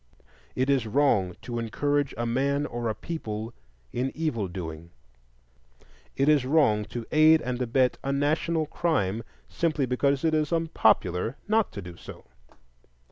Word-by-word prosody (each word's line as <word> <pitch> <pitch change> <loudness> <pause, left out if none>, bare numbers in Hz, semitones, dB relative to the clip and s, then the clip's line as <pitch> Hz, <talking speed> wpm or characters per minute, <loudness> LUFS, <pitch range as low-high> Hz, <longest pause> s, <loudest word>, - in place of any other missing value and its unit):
It 130 +1 +1
is 135 -5 +2
wrong 105 -8 +2
to 120 -1 -4
encourage 145 +5 -1
a 120 - -1
man 140 +4 0
or 120 -4 -3
a 110 - -2
people 110 -9 -5 0.4
in 130 +2 -1
evil 140 -11 -1
doing; 85 -2 -7 1.3
it 135 - +2
is 150 -3 +5
wrong 130 -7 +3
to 120 +1 -6
aid 155 +1 +6
and 125 0 -3
abet 125 +1 +1
a 135 - -1
national 155 +3 +1
crime 130 - 0 0.3
simply 155 -5 0
because 135 +3 +1
it 160 - +2
is 155 -2 +1
unpopular 115 - +1
not 220 0 +2
to 100 - -6
do 85 -1 -10
so. - - -11
130 Hz, 145 wpm, -27 LUFS, 110-150 Hz, 1.3 s, aid